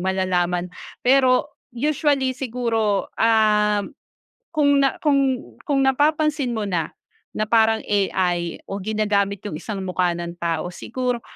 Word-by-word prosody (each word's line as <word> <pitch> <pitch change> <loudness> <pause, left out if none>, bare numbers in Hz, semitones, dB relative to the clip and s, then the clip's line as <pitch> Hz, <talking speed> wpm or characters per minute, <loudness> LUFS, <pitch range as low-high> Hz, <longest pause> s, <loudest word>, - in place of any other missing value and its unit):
malalaman, 180 -1 0 0.3
pero 260 +2 +3 0.2
usually 285 -1 +1
siguro, 230 -5 -1 0.2
um, 210 0 +3 0.6
kung 285 -2 +4
na 275 - +2
kung 285 -2 +4 0.5
kung 275 -2 +2
napapansin 290 -2 +1
mo 220 - -2
na 175 -5 -1 0.4
na 215 - -2
parang 225 0 +3
AI 180 -4 0
o 195 0 -5
ginagamit 205 -1 0
yung 205 - -4
isang 200 +6 -5
mukha 180 -1 0
ng 170 0 -5
tao. 170 +1 -2
Siguro 250 +3 -3
215 Hz, 120 wpm, -22 LUFS, 190-260 Hz, 0.6 s, kung